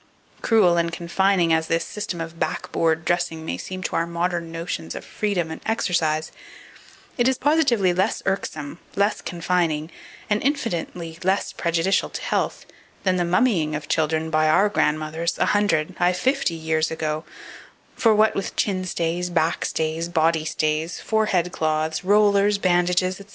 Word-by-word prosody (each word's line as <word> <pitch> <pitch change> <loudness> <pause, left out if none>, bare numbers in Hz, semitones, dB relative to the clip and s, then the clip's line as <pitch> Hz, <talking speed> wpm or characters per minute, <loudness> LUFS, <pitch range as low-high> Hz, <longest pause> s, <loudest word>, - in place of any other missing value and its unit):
Cruel 195 -7 +4
and 170 0 +1
confining 175 0 +1
as 160 0 +1
this 165 0 0
system 205 -5 -5
of 165 0 -6
"backboard" 160 -1 -1
dressing 170 -2 -1
may 85 - -2
seem 185 - -6
to - - -3
our 165 - +1
modern 170 0 -2
notions 165 - -5
of - - -7
freedom 195 -7 -2
and 160 - -7
exercise, 160 -8 0 0.9
it 240 - +4
is 260 -1 +2
positively 255 - +3
less 185 +2 0
irksome, 160 -5 -3 0.2
less 200 +2 +1
confining, 170 -2 -1 0.4
and 210 -1 +1
infinitely 175 - -2
less 190 +2 0
prejudicial 170 +3 +1
to - - -6
health, - - -1 0.4
than 185 -1 +2
the 175 - +1
mummying 175 -4 +2
of 145 -1 -5
children 160 +1 0
by 155 0 +3
our 200 +6 +4
grandmothers 155 -1 0
a - - +2
hundred, 200 -7 +1
ay, 175 +1 +3
fifty 255 -2 0
years 160 -1 0
ago: 155 -1 -3 0.7
for 225 -2 +4
what 215 +1 +4
with 195 - -4
chin 190 -3 0
stays, 175 0 -2
back 165 -1 0
stays, 160 +1 -2
body 160 -1 +2
stays, 155 +2 -1
forehead 195 -6 +1
cloths, 155 0 -1
rollers, 205 +1 +4
bandages, 180 0 +1
&c. 200 - -12
170 Hz, 155 wpm, -23 LUFS, 160-195 Hz, 0.9 s, Cruel